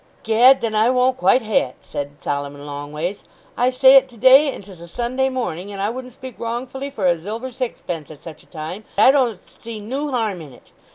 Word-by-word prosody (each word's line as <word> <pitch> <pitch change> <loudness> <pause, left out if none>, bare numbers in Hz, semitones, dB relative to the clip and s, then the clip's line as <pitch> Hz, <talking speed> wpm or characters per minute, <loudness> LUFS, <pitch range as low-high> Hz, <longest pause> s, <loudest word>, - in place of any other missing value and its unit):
"Gad, 245 +4 +5
then 230 -2 -2
I 215 +2 +3
won't 255 0 +2
quite 260 -1 +3
ha'e 215 -1 0
it," - - -19
said 145 0 -7
Solomon 145 0 -4
Longways. 150 +6 -5 0.3
"I 245 +1 +2
say 260 +1 +7
it 265 0 +3
to 240 - -17
day, 265 +5 +6
and 200 - -9
'tis 190 -3 -14
a 170 - -10
Sunday 245 +7 -1
morning, 205 -7 -4
and 200 - -7
I 205 +2 0
wouldn't 255 0 -8
speak 260 +1 -11
wrongfully 250 +4 -4
for 210 -8 -4
a 175 -1 +4
zilver 220 +9 -6
zixpence 180 - -5
at 155 -2 -12
such 165 -3 -10
a - - -23
time. 165 +6 -7
I 215 +6 +7
don't 250 -8 +1
see 230 -2 -9
noo 265 +8 -4
harm 220 -8 -2
in 145 -4 -11
it. - - -20
225 Hz, 220 wpm, -20 LUFS, 175-255 Hz, 0.3 s, say